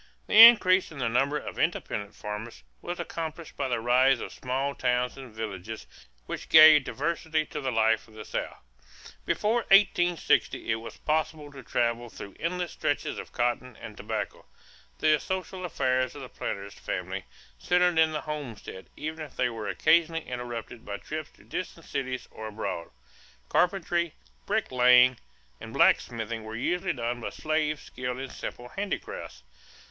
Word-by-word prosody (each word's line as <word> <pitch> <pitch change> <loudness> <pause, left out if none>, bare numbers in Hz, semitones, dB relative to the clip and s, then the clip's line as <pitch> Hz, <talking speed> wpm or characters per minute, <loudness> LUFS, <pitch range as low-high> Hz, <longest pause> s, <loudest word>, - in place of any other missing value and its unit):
The - - -5
increase 185 -6 +4
in 155 - -10
the 125 -3 0
number 135 +5 +1
of - - -7
independent 105 +1 -1
farmers 105 +2 -7 0.2
was 175 +1 -5
accompanied 165 -1 -5
by - - -1
the 120 -2 0
rise 125 +2 +4
of - - -6
small 135 +2 -2
towns 125 -1 0
and 130 -3 -10
villages 110 -1 -6 0.4
which - - -6
gave 155 -3 +9
diversity 155 +3 -1
to 150 - -6
the 130 -1 -1
life 110 -1 +2
of 110 - -18
the 105 -1 -8
South. - - -4 0.7
Before 220 +3 +1
1860 175 - +3
it 110 - +1
was 115 0 -9
possible 155 -1 -1
to 135 -2 -10
travel 120 -1 -1
through 100 -2 -10
endless 175 +1 -2
stretches 145 - -2
of - - -9
cotton 120 0 -1
and - - -9
tobacco. - - -5 0.5
The 155 -1 +3
social 190 +1 -4
affairs 130 -5 0
of 140 - -8
the 130 - -9
planter's 100 0 -5
family - - -4 0.3
centered 180 - +3
in 160 0 +5
the 150 - -3
homestead 140 -11 -7
even 155 +1 -5
if 150 - -11
they - - +1
were 110 -3 -5
occasionally 165 +3 +2
interrupted 120 -1 -6
by 100 0 -5
trips 155 +5 -6
to - - -20
distant 170 -2 -6
cities 130 -2 -3
or 110 - -7
abroad. 105 -6 -4 0.6
Carpentry, 175 -2 +1 0.3
bricklaying, 125 0 +5 0.4
and - - -9
blacksmithing 115 -1 +2
were 110 +1 -7
usually 175 +10 0
done 120 -1 -3
by - - -3
slaves 155 -2 -1
skilled 125 0 -5
in 135 0 -6
simple 125 0 -7
handicrafts. 200 - -5
130 Hz, 155 wpm, -28 LUFS, 115-160 Hz, 0.7 s, gave